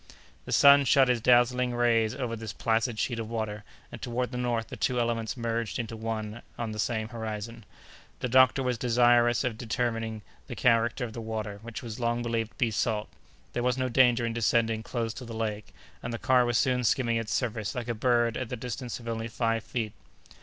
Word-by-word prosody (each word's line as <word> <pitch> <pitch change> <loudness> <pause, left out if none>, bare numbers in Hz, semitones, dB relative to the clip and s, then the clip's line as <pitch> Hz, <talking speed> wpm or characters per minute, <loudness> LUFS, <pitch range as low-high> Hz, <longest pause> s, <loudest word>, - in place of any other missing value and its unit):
The - - -7
sun 140 0 +7
shot 135 0 +5
his 120 -2 +2
dazzling 125 +1 +3
rays 115 -2 +2
over 125 -4 -3
this 110 -1 -6
placid 115 0 0
sheet 115 +2 -1
of 110 -1 -5
water, 110 -2 -3 0.3
and - - -9
toward 125 +1 -2
the 125 - -4
north 120 -2 -1
the - - -6
two 125 -1 0
elements 115 0 -1
merged 115 -1 -2
into 115 -1 -4
one 110 0 -4 0.2
and 115 -2 -3
the 105 - -7
same 110 0 -1
horizon. 115 0 -6 0.6
The - - -1
doctor 130 +2 +5
was 125 -3 -1
desirous 120 0 +4
of 115 -4 -2
determining 115 -2 -2 0.2
the - - -6
character 115 +1 +2
of 110 - -8
the 115 - -6
water, 110 -2 -4
which 115 +1 -7
was 115 -1 -7
long 120 0 0
believed 115 -1 -2
to - - -32
be 115 -2 +1
salt. 105 0 -1 0.4
There 120 - -1
was 125 0 +1
no 130 -1 0
danger 120 -1 +4
in 115 - -2
descending 115 -1 +1
close 115 0 -3
to 130 - -8
the 115 -2 -8
lake, 110 -2 -3 0.3
and 120 - -5
the 115 - -3
car 130 0 +3
was 120 -1 +1
soon 125 0 +2
skimming 115 0 +2
its 115 -1 -3
surface 110 -4 -2
like 120 -1 -4
a 120 - -1
bird 120 0 +2
at 130 -3 -4
the 125 - -4
distance 125 +1 -5
of 115 - -11
only 115 0 -3
five 115 -1 -1
feet. 115 -2 -3
115 Hz, 210 wpm, -28 LUFS, 110-125 Hz, 0.6 s, sun